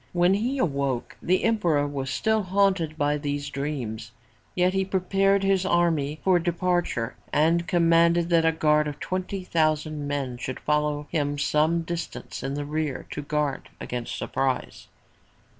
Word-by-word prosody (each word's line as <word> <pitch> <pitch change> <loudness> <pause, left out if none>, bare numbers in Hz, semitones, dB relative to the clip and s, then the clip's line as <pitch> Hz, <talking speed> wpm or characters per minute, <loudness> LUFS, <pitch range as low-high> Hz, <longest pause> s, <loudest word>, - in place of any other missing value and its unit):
When 175 +1 +4
he 240 +7 0
awoke 140 - -1
the 185 +1 +1
emperor 175 -11 +2
was 135 -2 -4
still 220 +11 +1
haunted 190 -5 +1
by 145 0 +1
these 145 -1 -3
dreams, 135 -6 -4 0.5
yet 180 +1 +2
he 190 0 +1
prepared 195 +1 +1
his 195 -1 +2
army 165 -5 +1
for 185 -2 +4
departure 175 -8 -1 0.2
and 165 +3 +2
commanded 170 0 +3
that 165 -1 +4
a 165 - +4
guard 150 -1 +2
of 145 -1 -6
twenty 185 +1 -3
thousand 155 -3 0
men 135 -4 -3
should 130 +1 -5
follow 150 0 0
him 145 -3 0
some 155 +3 +2
distance 170 0 -5
in 135 +1 -3
the 145 0 -3
rear 150 -2 -3
to - - -4
guard 145 -1 -2
against 120 -1 -4
surprise. 135 -1 -2
155 Hz, 150 wpm, -25 LUFS, 145-180 Hz, 0.5 s, When